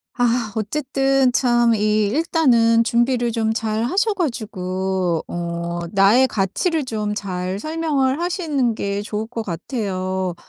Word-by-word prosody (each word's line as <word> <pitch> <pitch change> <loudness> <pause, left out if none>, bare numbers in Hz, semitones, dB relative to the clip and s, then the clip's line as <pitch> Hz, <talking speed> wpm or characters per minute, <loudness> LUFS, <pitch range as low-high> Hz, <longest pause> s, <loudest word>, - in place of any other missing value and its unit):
아. 240 -3 0
어쨌든 270 +3 +1
참 240 -2 +3
이 215 0 +2
일단은 250 -7 +3
준비를 240 +1 +1
좀 220 -1 0
잘 220 -1 -1
하셔 400 - +1
가지고 190 - -2
어 170 0 -4
나의 205 +6 +5
가치를 265 - -1
좀 210 -3 -2
잘 185 -1 -3
설명을 305 -2 0
하시는 310 - 0
게 200 -1 -2
좋을 210 +1 -4
것 230 -1 -5
같아요. 185 - -3
230 Hz, 230 characters per minute, -21 LUFS, 195-265 Hz, -, 나의